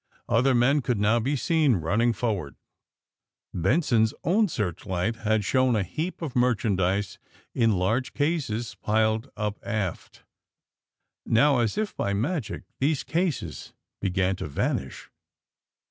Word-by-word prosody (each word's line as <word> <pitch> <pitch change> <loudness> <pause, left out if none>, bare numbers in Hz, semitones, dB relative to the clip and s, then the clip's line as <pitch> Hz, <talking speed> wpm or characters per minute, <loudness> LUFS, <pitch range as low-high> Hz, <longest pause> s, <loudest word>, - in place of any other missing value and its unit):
Other 125 +3 +3
men 135 +5 +3
could 120 -4 -1
now 110 +3 +3
be 135 +6 0
seen 150 -2 +2
running 105 +8 +1
forward. 105 - -2 1.0
Benson's 110 - +2
own 205 +7 +3
searchlight 95 - -2
had 110 -2 0
shown 130 +2 +2
a 105 - +1
heap 165 - -4
of 145 -6 -5
merchandise, 100 -6 +1 0.3
in 115 -3 +3
large 105 +8 0
cases, 130 -7 -1
piled 110 +1 0
up 105 -1 -2
aft. 105 -6 -4 1.0
Now, 135 +3 +3
as 115 -3 0
if 215 -1 -2
by 100 - -1
magic, 120 - -2 0.2
these 145 +1 +1
cases 160 - -2 0.3
began 95 -1 +1
to - - -5
vanish. 70 - -3
115 Hz, 125 wpm, -26 LUFS, 100-135 Hz, 1.0 s, Other